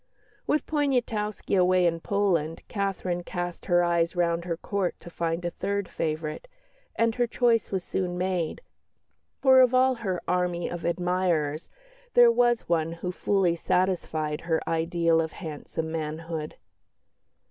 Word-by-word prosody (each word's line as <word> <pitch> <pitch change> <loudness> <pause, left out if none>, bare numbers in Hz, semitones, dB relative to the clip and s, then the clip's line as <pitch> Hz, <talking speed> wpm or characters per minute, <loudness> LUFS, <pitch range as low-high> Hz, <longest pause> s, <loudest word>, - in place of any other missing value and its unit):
With 300 - +1
Poniatowski 240 -10 0
away 185 -1 +4
in 165 -1 +1
Poland, 170 -5 0
Catherine 195 -4 -2
cast 175 0 -5
her 175 -1 +4
eyes 170 0 +1
round 170 -1 0
her 170 -2 -2
Court 190 0 -2
to 175 - -12
find 165 +1 -2
a 175 - -1
third 200 +2 -2
favourite, 155 - -3 0.5
and 230 0 +2
her 240 +1 +1
choice 235 -1 +2
was 190 -2 -2
soon 180 -1 -2
made, 180 - -1 0.8
for 260 -1 +7
of 255 0 +4
all 260 +1 +5
her 200 -7 -3
army 180 -1 0
of 175 -1 -5
admirers 170 -3 0 0.5
there 240 -1 +8
was 240 0 +2
one 165 -1 +1
who 180 +2 -4
fully 185 -2 +1
satisfied 165 -4 0
her 165 -2 0
ideal 165 0 +2
of 160 -1 -4
handsome 160 -1 -5
manhood. 160 0 -4
175 Hz, 140 wpm, -27 LUFS, 165-200 Hz, 0.8 s, there